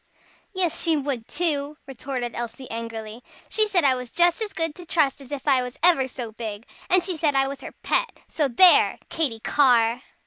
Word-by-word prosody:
"Yes 370 -4 0
she 330 -2 +2
would 270 -5 -4
too," 300 -4 -1
retorted 260 -2 -5
Elsie 240 +2 -6
angrily. 225 0 -7 0.3
"She 435 -1 +3
said 370 -5 +2
I 270 -2 +4
was 250 -1 -5
just 345 - +2
as 430 -2 -2
good 325 -2 -2
to 355 - -12
trust 290 -4 +1
as 270 - -14
if 285 0 -6
I 265 -3 +4
was 250 0 -7
ever 330 -7 +4
so 245 -3 -7
big. 220 -1 -7 0.2
And 365 -1 +4
she 360 -1 -2
said 300 -3 0
I 270 0 +2
was 275 0 -7
her - - -9
pet. - - 0
So 300 -3 -1
there! 345 +9 +5
Katy 265 -9 -1
Carr!" 245 -4 +3
275 Hz, 200 wpm, -24 LUFS, 240-330 Hz, 0.3 s, there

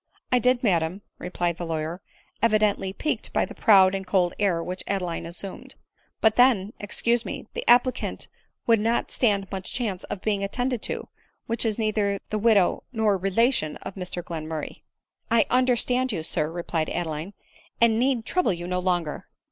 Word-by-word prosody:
" - - -48
I 250 - +4
did, 250 +1 +2
madam," 180 -1 +1 0.2
replied 175 -1 -2
the 175 - -4
lawyer, 160 +2 -3 0.4
evidently 215 -3 +2
piqued 305 +10 -3
by - - +2
the - - -10
proud 195 -4 +5
and 195 0 -2
cold 180 -2 +2
air 180 -5 +1
which 185 +2 -5
Adeline 180 -4 -2
assumed; 185 +3 -8 0.2
" - - -41
but 220 -1 +3
then 240 -6 +5
^ - - -43
excuse 235 +3 +1
me - - -6
— - - -51
the 475 - -3
applicant 250 +1 +3 0.4
would 230 -2 +4
not 230 +3 0
stand 200 -5 +1
much 190 -2 -4
chance 215 -7 -2
of 190 - -6
being 205 -2 0
attended 245 +3 -1
to, - - -3 0.4
who 230 - -3
is 225 -2 0
neither 210 -3 0
the' 215 - 0
widow 210 -4 +3
nor 220 -4 +2
relation 195 - +1
of - - -6
Mr 180 -2 -5
Glenmurray." 160 -2 -5 0.3
" - - -64
I 230 -3 +4
understand 255 0 +2
you, 165 -7 -3
sir," 155 -1 -1
replied 165 -2 -2
Adeline, 165 +3 -4 0.2
" - - -31
and 230 -1 +4
need 250 -2 +1
trouble 360 - +1
you 175 0 -6
no 180 0 -1
longer." 175 -4 -1
200 Hz, 185 wpm, -25 LUFS, 180-230 Hz, 0.4 s, proud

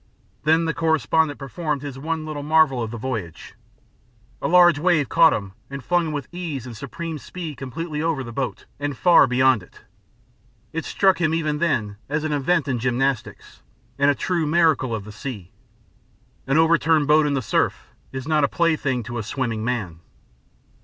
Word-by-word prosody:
Then 160 +2 +3
the 165 - 0
correspondent 160 -1 +1
performed 145 +1 -4
his 140 -2 -6
one 160 +2 -3
little 155 -2 -5
marvel 150 -4 +3
of 115 - -3
the 120 - -6
voyage. 110 -9 -5 0.9
A - - 0
large 175 -3 +6
wave 155 -4 +2
caught 165 -1 +6
him 100 -2 -3 0.2
and 140 -1 -7
flung 175 +1 +1
him - - -3
with 145 -2 -4
ease 165 -8 -5
and 120 -2 -8
supreme 160 +6 -6
speed 165 -4 -7
completely 150 +4 -5
over 160 -4 -1
the 120 - -8
boat 130 +1 -4
and 145 -2 -3
far 170 -5 +6
beyond 130 -2 +3
it. 90 - -17 0.9
It 165 0 -3
struck 190 -3 +2
him 160 0 +2
even 150 -2 -1
then 110 -12 0
as 150 +1 -1
an 155 -1 -1
event 145 +2 +1
in 130 -3 -1
gymnastics, 125 +1 -2 0.4
and 140 0 +4
a 145 - +3
true 170 +1 -1
miracle 155 -7 +2
of 105 - -5
the 105 - -9
sea. 105 -5 -7 1.0
An 135 +2 +2
over 165 0 +4
turned 155 -2 +2
boat 150 0 +4
in 145 - 0
the 135 - 0
surf 105 - -1 0.2
is 130 +1 -6
not 155 -2 +2
a - - +4
plaything 150 -7 0
to 120 +2 -5
a - - -3
swimming 115 -1 -3
man. 105 -9 -3
145 Hz, 185 wpm, -22 LUFS, 125-160 Hz, 1.0 s, large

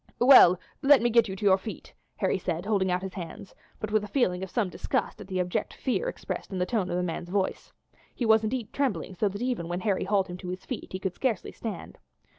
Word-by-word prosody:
"Well, 240 -9 +8 0.2
let 285 -1 +7
me 240 - +2
get 235 0 +5
you 190 - -5
to 205 - -5
your 190 -1 +5
feet," 215 +3 -8 0.2
Harry - - +1
said, 175 0 -3
holding 200 -3 +1
out 180 +1 0
his 190 -1 -5
hands, 190 +2 -8 0.3
but 215 - -4
with 215 -1 +2
a - - -5
feeling 190 -8 +1
of 190 - -5
some 220 0 0
disgust 180 - -2
at - - -9
the 185 -1 -2
abject 180 0 -2
fear 440 - -1
expressed - - -6
in 190 - -3
the 180 - +1
tones 190 -1 -1
of 175 - -1
the 180 - 0
man's 175 0 -4
voice. 195 0 -2 0.4
He 245 - -2
was 220 0 +5
indeed 225 0 -3
trembling 265 -8 -1
so 200 +3 0
that 200 +4 -5
even 245 -10 -1
when 175 +1 -3
Harry 200 -3 0
hauled 195 -1 +2
him 180 - -7
to 180 0 -7
his 185 +1 -6
feet 255 - -6
he 185 - -3
could 190 -1 -2
scarcely 235 -5 -1
stand. 210 -7 -7
195 Hz, 245 wpm, -27 LUFS, 180-225 Hz, 0.4 s, Well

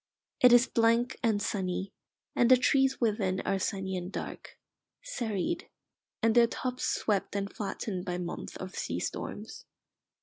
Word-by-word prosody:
It 250 - +8
is 245 +1 +7
blank 230 +1 +2
and 220 -4 +2
sunny, 190 -1 -2 0.4
and 240 - +4
the 255 - +8
trees 265 +1 +3
within 205 -5 +1
are 195 - 0
sunny 190 0 -2
and 180 +1 -4
dark, - - -7 0.5
serried, 245 - -2 0.5
and 225 -1 +4
their 235 0 +6
tops 255 +1 -3
swept 205 -2 0
and 200 0 -2
flattened 195 -3 -4
by 180 -2 -3
months 175 -1 -5
of 185 0 -7
sea 85 +1 -3
storms. - - -5
210 Hz, 145 wpm, -30 LUFS, 190-240 Hz, 0.5 s, It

